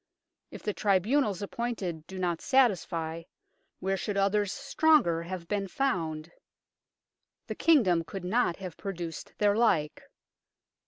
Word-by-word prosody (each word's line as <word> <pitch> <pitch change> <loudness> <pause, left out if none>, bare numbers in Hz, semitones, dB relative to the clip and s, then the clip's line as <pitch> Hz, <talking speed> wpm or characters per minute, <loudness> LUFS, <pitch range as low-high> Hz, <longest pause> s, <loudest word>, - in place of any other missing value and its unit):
If - - -10
the 210 - -1
tribunals 205 +1 +1
appointed 195 -8 -4
do 190 - -8
not 175 -3 -1
satisfy, 175 - +1 0.6
where 195 +1 -1
should 200 +2 -3
others 200 0 +2
stronger 275 - +2
have 170 0 -6
been 200 +1 -1
found? 170 - -2 1.1
The - - -4
Kingdom 200 - +3
could 190 +2 -7
not 210 -2 +1
have 185 -4 -8
produced 175 -5 -6
their 205 -1 +3
like. 180 -10 +1
195 Hz, 120 wpm, -29 LUFS, 170-215 Hz, 1.1 s, Kingdom